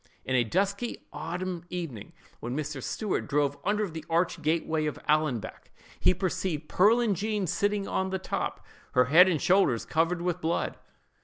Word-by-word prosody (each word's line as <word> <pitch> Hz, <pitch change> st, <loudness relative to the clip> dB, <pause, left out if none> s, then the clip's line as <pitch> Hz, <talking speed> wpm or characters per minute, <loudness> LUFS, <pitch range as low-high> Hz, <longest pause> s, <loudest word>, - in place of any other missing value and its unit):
"In 130 Hz, -, -2 dB
a 125 Hz, -, +4 dB
dusky 200 Hz, -, -1 dB
autumnal 175 Hz, +2 st, -4 dB
evening, 165 Hz, -, -6 dB, 0.3 s
when 120 Hz, +4 st, -4 dB
Mr. 150 Hz, -2 st, -4 dB
Stuart 210 Hz, -, -2 dB
drove 145 Hz, -1 st, +1 dB
under 210 Hz, +1 st, +1 dB
the 160 Hz, -2 st, -7 dB
arched 170 Hz, 0 st, +1 dB
gateway 160 Hz, 0 st, 0 dB
of 150 Hz, -, -3 dB
Allanbank, 150 Hz, -7 st, 0 dB, 0.3 s
he 185 Hz, -, +4 dB
perceived 175 Hz, -4 st, -2 dB
Pearlin 220 Hz, +3 st, +4 dB
Jean 205 Hz, +1 st, -1 dB
sitting 205 Hz, +3 st, 0 dB
on 190 Hz, 0 st, -1 dB
the 190 Hz, -, -1 dB
top, 190 Hz, -, -4 dB, 0.3 s
her 125 Hz, -, +5 dB
head 180 Hz, +3 st, +9 dB
and 165 Hz, -4 st, +1 dB
shoulders 175 Hz, -, +3 dB
covered 165 Hz, +2 st, 0 dB
with 180 Hz, 0 st, -1 dB
blood. 165 Hz, +2 st, -1 dB
170 Hz, 160 wpm, -28 LUFS, 150-190 Hz, 0.3 s, head